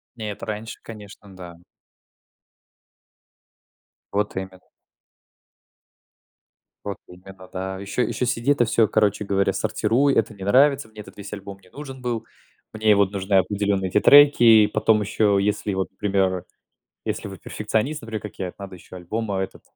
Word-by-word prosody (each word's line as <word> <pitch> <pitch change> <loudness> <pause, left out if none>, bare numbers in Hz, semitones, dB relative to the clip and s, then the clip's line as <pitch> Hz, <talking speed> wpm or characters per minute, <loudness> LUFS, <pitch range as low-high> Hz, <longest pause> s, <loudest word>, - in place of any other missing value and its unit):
Нет, 105 -3 -6
раньше, 110 0 -6
конечно, 105 -3 -12
да. 90 -2 -10 2.5
Вот 105 0 -1
именно. 95 -1 -6 2.2
Вот 100 -2 -5
именно, 95 +1 -14
да. 95 0 -5
Еще 100 +5 -2
еще 125 - -2
сиди 120 +3 0
это 120 -4 +3
всё, 110 -1 +3
короче 105 -1 +1
говоря, 100 0 +1
сортируй. 135 +6 +1
Это 110 - +1
не 95 -2 -10
нравится, 135 +4 +4
мне 110 -1 -11
этот - - -15
весь 100 0 -8
альбом 100 -1 -8
не 90 -1 -23
нужен 135 -1 -9
был. 120 -3 -3 0.5
Мне, 110 0 +2
э, - - +6
вот, 100 -1 +2
нужны 100 0 -1
определенные 100 -1 +1
эти 105 - +3
треки, 145 -1 +7
и 110 -2 +7
потом 105 0 +2
еще, 105 0 +1
если, 105 0 -1
вот, 95 0 -2
к 95 - -43
примеру, 95 -3 0 0.6
если - - -4
вы - - -9
перфекционист, 135 +7 -2
например, 110 -1 -5
как 105 - -9
я, 95 - -3
это - - -12
надо 100 -1 -8
еще 90 - -13
альбом, 105 +5 -4
а, 95 - -1
этот. 95 - -7
105 Hz, 160 wpm, -23 LUFS, 95-110 Hz, 2.5 s, треки